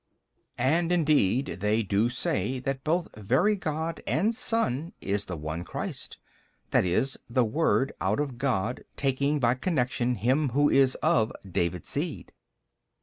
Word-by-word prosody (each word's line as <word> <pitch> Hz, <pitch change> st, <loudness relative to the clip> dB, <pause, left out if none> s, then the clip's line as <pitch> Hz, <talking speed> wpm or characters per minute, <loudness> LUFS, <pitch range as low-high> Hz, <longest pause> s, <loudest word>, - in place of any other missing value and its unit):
B. -, -, -44 dB, 0.2 s
And 165 Hz, +6 st, +2 dB
indeed 145 Hz, -, +2 dB
they 105 Hz, +3 st, +1 dB
do 105 Hz, +3 st, +1 dB
say 130 Hz, -1 st, -1 dB
that 135 Hz, 0 st, -3 dB
both 170 Hz, +2 st, -1 dB
Very 130 Hz, -, +2 dB
God 160 Hz, -2 st, -3 dB
and 170 Hz, -, +2 dB
Son 180 Hz, -, 0 dB
is 100 Hz, +1 st, -1 dB
the 90 Hz, -, -5 dB
One 80 Hz, +3 st, -4 dB
Christ, -, -, -6 dB, 0.6 s
i. -, -, +5 dB
e., 90 Hz, +7 st, +2 dB, 0.2 s
the 120 Hz, +1 st, +2 dB
Word 135 Hz, +2 st, +1 dB
out 95 Hz, +6 st, +1 dB
of 135 Hz, -5 st, -3 dB
God 125 Hz, -3 st, -1 dB
taking 140 Hz, +2 st, +1 dB
by 120 Hz, -2 st, +3 dB
connection 125 Hz, -4 st, 0 dB
him 130 Hz, +7 st, +1 dB
who 145 Hz, 0 st, +4 dB
is 135 Hz, -1 st, +4 dB
of 110 Hz, -1 st, +3 dB, 0.2 s
David's 85 Hz, -2 st, -2 dB
seed. -, -, -3 dB
130 Hz, 145 wpm, -27 LUFS, 110-155 Hz, 0.6 s, i